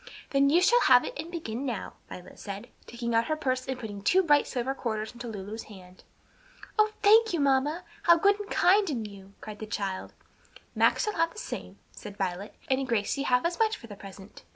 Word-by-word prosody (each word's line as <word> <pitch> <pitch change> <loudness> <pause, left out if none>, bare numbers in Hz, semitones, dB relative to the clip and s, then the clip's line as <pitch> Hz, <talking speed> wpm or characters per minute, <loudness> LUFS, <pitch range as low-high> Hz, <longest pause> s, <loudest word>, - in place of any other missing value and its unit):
"Then 275 0 +4
you 340 +5 +4
shall 485 +5 +5
have 250 -1 +6
it - - -5
and 315 +3 -6
begin 275 -8 -5
now," 245 -7 -4 0.2
Violet 180 0 -11
said, 200 0 -7 0.2
taking 235 0 -4
out 230 0 +3
her 310 - 0
purse 255 -4 -2
and 260 -1 -3
putting 205 -4 -7
two 370 - +3
bright 295 -4 +4
silver 260 +1 -2
quarters 220 -5 -3
into 240 0 -8
Lulu's 215 0 -6
hand. 185 -3 -14 0.8
"Oh, 430 0 +4
thank 440 0 +6
you, 340 - 0
mamma, 280 +4 +1 0.2
how 340 -1 +6
good 400 +4 +3
and 415 - -7
kind 390 +1 +4
in 235 -7 -2
you!" 200 -1 -12
cried 215 -1 -9
the 215 - -6
child. 195 -3 -4 0.6
"Max - - +3
shall 425 -2 -1
have 330 0 +2
the - - -16
same," - - -7
said 205 -3 -10
Violet, 190 +1 -3
"and 265 0 0
Gracie 230 +3 0
half 250 0 +2
as 345 0 -1
much 440 -1 +2
for - - -13
the 210 -3 -10
present. 195 0 -12
255 Hz, 210 wpm, -28 LUFS, 210-330 Hz, 0.8 s, have